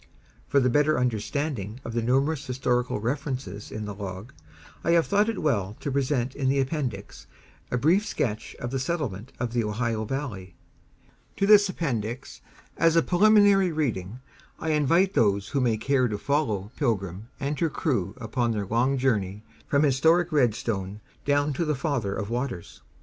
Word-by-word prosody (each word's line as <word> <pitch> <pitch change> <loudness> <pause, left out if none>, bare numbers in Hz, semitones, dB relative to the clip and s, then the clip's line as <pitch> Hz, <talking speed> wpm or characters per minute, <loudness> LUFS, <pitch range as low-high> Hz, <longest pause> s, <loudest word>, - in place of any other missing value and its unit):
For 140 - +3
the 125 - +2
better 150 +3 +3
understanding 120 -1 -2
of 115 - -5
the 120 - 0
numerous 135 +5 +1
historical 125 -2 0
references 125 -4 -4
in 105 0 -5
the 105 - -5
Log, 100 +5 -7 0.5
I 170 - +2
have 170 -1 +4
thought 205 +2 +2
it 225 - -3
well 105 -9 0
to 140 - -3
present 135 -2 0
in 135 -2 0
the 135 +1 +2
Appendix 130 -8 -3 0.4
a 125 - 0
brief 165 - +3
sketch 110 - -3
of 120 - -5
the 135 - -1
settlement 130 - -3
of 120 -1 -2
the 120 -1 +1
Ohio 110 +1 -1
Valley. 105 -9 -5 0.8
To 195 - +2
this 205 -1 +7
Appendix, 125 - -4 0.4
as 165 0 +3
a 165 - +5
preliminary 200 -1 +5
reading, 120 - -2 0.4
I 160 - -1
invite 165 +6 +3
those 100 - +2
who 140 - 0
may 115 -3 +2
care 130 +2 +2
to 105 -2 -3
follow 110 -7 -1
"Pilgrim" 100 - -1
and 140 +1 -2
her 165 - +2
crew 125 - -1
upon 120 -1 -1
their 105 -2 -2
long 120 +7 +1
journey 105 -6 0 0.2
from 140 +1 +2
historic 160 +5 +3
Redstone 110 -7 0 0.3
down 145 +1 +2
to 155 - -1
the 150 -2 0
Father 130 -8 -1
of 100 +1 -4
Waters. 120 -8 -4
130 Hz, 165 wpm, -26 LUFS, 110-150 Hz, 0.8 s, this